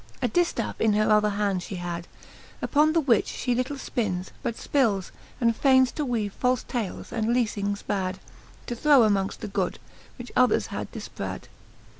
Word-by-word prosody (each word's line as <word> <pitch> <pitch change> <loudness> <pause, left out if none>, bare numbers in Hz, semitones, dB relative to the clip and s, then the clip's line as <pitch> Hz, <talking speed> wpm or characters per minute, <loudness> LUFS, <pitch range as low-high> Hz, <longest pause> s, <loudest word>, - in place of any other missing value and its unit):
A - - +1
diftaffe 345 +9 0
in 220 -1 +4
her 215 +1 +2
other 210 0 +4
hand 200 -2 0
fhe 190 +1 -6
had, 175 -1 -5 0.5
Upon 305 +2 +3
the 330 - +4
which 250 -9 +2
fhe 250 -2 -1
little 255 +3 -1
ipinnes, 195 -9 -2
but 235 -2 -2
fpils, 220 -11 0 0.3
And 230 -2 +2
faynes 260 -1 +4
to 300 - -3
weave 225 -7 -1
falfe 250 -1 +2
tales 230 -7 -4
and 225 0 0
leafings 205 -4 -1
bad^ 190 -2 -1 0.5
To 240 - -4
throw 285 +1 +5
amongft 200 -3 +1
the 215 - -4
good, 195 - -1 0.4
which 245 -1 -9
others 255 -1 +4
had - - -4
diiprad. - - -6
225 Hz, 170 wpm, -26 LUFS, 200-255 Hz, 0.5 s, throw